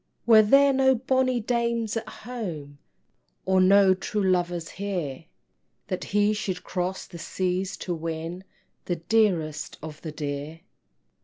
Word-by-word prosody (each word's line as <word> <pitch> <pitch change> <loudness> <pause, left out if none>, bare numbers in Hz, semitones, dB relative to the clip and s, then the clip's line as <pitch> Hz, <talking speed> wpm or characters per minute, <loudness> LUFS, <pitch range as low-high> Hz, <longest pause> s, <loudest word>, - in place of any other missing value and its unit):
Were 225 -2 +8
there 275 +6 +5
no 265 0 +4
bonny 260 0 +1
dames 235 -1 -1
at 225 -1 -3
home, 175 - -7 0.7
Or 190 0 +3
no 195 0 +6
true 200 +2 -2
lovers 175 -3 0
here, 175 -8 -4 0.6
That 185 - -3
he 205 +1 +2
should 190 -3 -3
cross 185 +1 -3
the 170 - -11
seas 185 +2 -2
to 180 - -1
win 165 +2 -5 0.4
The 175 - -1
dearest 165 -5 0
of 155 -1 -8
the 160 - -6
dear? 150 +1 -5
185 Hz, 135 wpm, -26 LUFS, 165-220 Hz, 0.7 s, Were